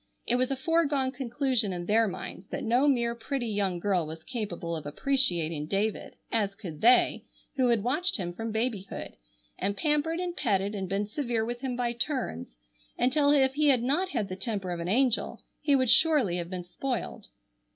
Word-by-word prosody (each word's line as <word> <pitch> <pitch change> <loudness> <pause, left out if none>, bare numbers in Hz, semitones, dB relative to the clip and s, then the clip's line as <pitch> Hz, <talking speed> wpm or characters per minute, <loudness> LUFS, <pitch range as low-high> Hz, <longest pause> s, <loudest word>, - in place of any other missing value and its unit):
It 240 - +2
was 255 0 +1
a 270 - 0
foregone 280 -2 +1
conclusion 255 -4 0
in 175 -1 -4
their 220 +3 +3
minds 190 0 -7
that - - -5
no 245 +5 +3
mere 235 -4 +2
pretty 240 +2 -3
young 200 -4 0
girl 180 -3 0
was 160 +1 -8
capable 195 -9 -4
of 155 -2 -6
appreciating 170 - 0
David, 205 +4 -2 0.2
as 205 -3 0
could 175 -8 -8
they, 245 +2 +5 0.3
who 255 -2 +3
had 230 -4 +2
watched 300 +9 +1
him 175 -3 -4
from 225 +4 -4
babyhood, 220 -3 -3 0.4
and 200 0 -1
pampered 310 +2 +1
and 355 -1 -3
petted 200 -4 0
and 190 -3 -4
been 200 +2 0
severe 230 0 -2
with 240 +1 -5
him 260 -2 -2
by 240 -1 -1
turns, 235 - -3 0.4
until 285 +3 +3
if 270 -2 +4
he 300 +1 +2
had 255 -4 +4
not 315 +9 +1
had 215 - -2
the 185 - -5
temper 195 -2 -3
of 175 - -3
an 170 +1 -3
angel 245 +3 +1 0.2
he 290 -2 +3
would 260 -3 +3
surely 280 - +4
have 170 -1 -4
been 180 -1 -5
spoiled. 245 +8 -4
235 Hz, 190 wpm, -28 LUFS, 195-270 Hz, 0.4 s, they